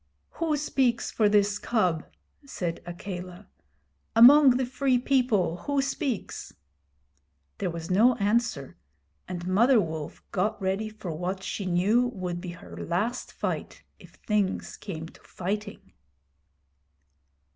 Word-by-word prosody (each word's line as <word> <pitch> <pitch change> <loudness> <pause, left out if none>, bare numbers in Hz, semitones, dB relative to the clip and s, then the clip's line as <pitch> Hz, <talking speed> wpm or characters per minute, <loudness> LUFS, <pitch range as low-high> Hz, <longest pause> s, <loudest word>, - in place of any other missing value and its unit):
'Who 320 -3 -1
speaks 265 -5 0
for 215 -2 +3
this 205 0 +3
cub?' 180 -9 0 0.4
said 180 -11 -4
Akela. 180 +1 -7 0.7
'Among 260 +2 +8
the 260 - 0
Free 260 0 +1
People 240 -10 +1
who 285 +8 -1
speaks?' 270 -3 -3 1.1
There - - -1
was 165 0 -6
no 235 +7 +5
answer, 200 - 0 0.5
and 175 -1 -5
Mother 230 +7 +5
Wolf 160 -5 -4
got 200 +3 0
ready 195 +3 -1
for 215 -5 -7
what 185 +4 -3
she 195 -1 -4
knew 205 +8 +3
would 180 -2 -4
be 180 - -6
her 170 - -12
last 210 +9 -2
fight, - - -4 0.2
if - - -16
things 210 -3 0
came 165 -5 -7
to - - -19
fighting. 200 - -5
205 Hz, 125 wpm, -27 LUFS, 180-245 Hz, 1.1 s, Among